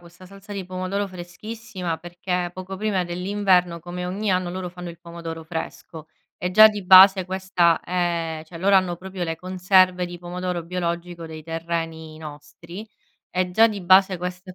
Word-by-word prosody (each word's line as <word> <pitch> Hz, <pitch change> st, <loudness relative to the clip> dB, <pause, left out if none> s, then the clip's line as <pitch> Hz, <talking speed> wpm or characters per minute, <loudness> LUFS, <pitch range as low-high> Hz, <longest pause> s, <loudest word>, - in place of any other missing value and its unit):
questa 175 Hz, +1 st, -16 dB
salsa 195 Hz, +2 st, -12 dB
di 195 Hz, -1 st, -4 dB
pomodoro 185 Hz, +2 st, -3 dB
freschissima 185 Hz, 0 st, -6 dB
perché 175 Hz, +1 st, -3 dB
poco 185 Hz, +1 st, -7 dB
prima 200 Hz, -3 st, 0 dB
dell'inverno, 180 Hz, -1 st, +1 dB
come 180 Hz, +1 st, -6 dB
ogni 200 Hz, +3 st, -2 dB
anno, 185 Hz, -1 st, +1 dB
loro 180 Hz, 0 st, -5 dB
fanno 180 Hz, 0 st, -8 dB
il 170 Hz, -1 st, -10 dB
pomodoro 170 Hz, -1 st, -8 dB
fresco 160 Hz, -1 st, -7 dB, 0.3 s
e 180 Hz, -, -2 dB
già 215 Hz, +4 st, +9 dB
di 210 Hz, -1 st, -5 dB
base 190 Hz, 0 st, +8 dB
questa 185 Hz, -3 st, +1 dB
è 170 Hz, -3 st, -2 dB
cioè 165 Hz, +1 st, -11 dB
loro 195 Hz, +3 st, +4 dB
hanno 185 Hz, -2 st, +1 dB
proprio 190 Hz, 0 st, -6 dB
le 165 Hz, -1 st, -3 dB
conserve 185 Hz, 0 st, +2 dB
di 175 Hz, 0 st, -9 dB
pomodoro 180 Hz, 0 st, -4 dB
biologico 170 Hz, -1 st, -4 dB
dei 160 Hz, -1 st, -9 dB
terreni 165 Hz, -1 st, -4 dB
nostri, 170 Hz, +6 st, -10 dB, 0.4 s
e 180 Hz, 0 st, -1 dB
già 225 Hz, +4 st, +6 dB
di 205 Hz, -2 st, -5 dB
base 190 Hz, +1 st, +5 dB
questo 180 Hz, +1 st, -6 dB
è -, -, -12 dB
180 Hz, 170 wpm, -23 LUFS, 170-190 Hz, 0.4 s, già